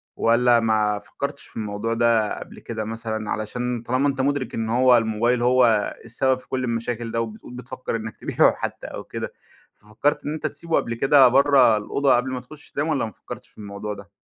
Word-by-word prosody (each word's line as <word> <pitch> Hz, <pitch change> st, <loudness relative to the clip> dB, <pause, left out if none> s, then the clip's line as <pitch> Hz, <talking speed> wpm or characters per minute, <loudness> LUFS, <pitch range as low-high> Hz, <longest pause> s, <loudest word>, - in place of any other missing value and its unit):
والّا 120 Hz, +1 st, +4 dB
ما 105 Hz, -2 st, +1 dB
فكرتش 140 Hz, +7 st, -6 dB
في -, -, -14 dB
الموضوع 110 Hz, +1 st, -2 dB
ده 115 Hz, -2 st, +2 dB
قبل -, -, -11 dB
كده 110 Hz, -2 st, -5 dB
مثلًا، 110 Hz, -1 st, -4 dB
علشان 120 Hz, +2 st, -3 dB
طالما 130 Hz, +4 st, +1 dB
أنت 135 Hz, -1 st, 0 dB
مُدرك 140 Hz, -3 st, -1 dB
إن 110 Hz, -1 st, -2 dB
هو 125 Hz, +1 st, +5 dB
الموبايل 115 Hz, +2 st, +1 dB
هو 120 Hz, -4 st, +3 dB
السبب 130 Hz, +3 st, +1 dB
في 130 Hz, -, -15 dB
كل 130 Hz, -1 st, -2 dB
المشاكل 115 Hz, -1 st, -3 dB
ده 115 Hz, 0 st, 0 dB
وبتقول 110 Hz, +2 st, -7 dB
بتفكر 125 Hz, 0 st, -5 dB
إنك 110 Hz, -2 st, -5 dB
تبيعُه -, -, +3 dB
حتى -, -, -5 dB
أو -, -, -7 dB
كده، -, -, -6 dB, 0.4 s
ففكرت 125 Hz, +8 st, -2 dB
إن 150 Hz, -, -2 dB
أنت 155 Hz, -, -2 dB
تسيبه 165 Hz, -1 st, -3 dB
قبل 115 Hz, -, 0 dB
كده 135 Hz, +2 st, +6 dB
برا 130 Hz, -3 st, +5 dB
الأوضة 135 Hz, +6 st, +2 dB
قبل 125 Hz, +2 st, 0 dB
ما 130 Hz, -, -3 dB
تخُش 145 Hz, +4 st, -13 dB
تنام 145 Hz, +3 st, -1 dB
والّا 150 Hz, -6 st, 0 dB
ما 110 Hz, -, -7 dB
فكرتش -, -, -10 dB
في -, -, -26 dB
الموضوع 105 Hz, 0 st, -6 dB
ده؟ 100 Hz, 0 st, -12 dB
120 Hz, 200 wpm, -23 LUFS, 110-130 Hz, 0.4 s, كده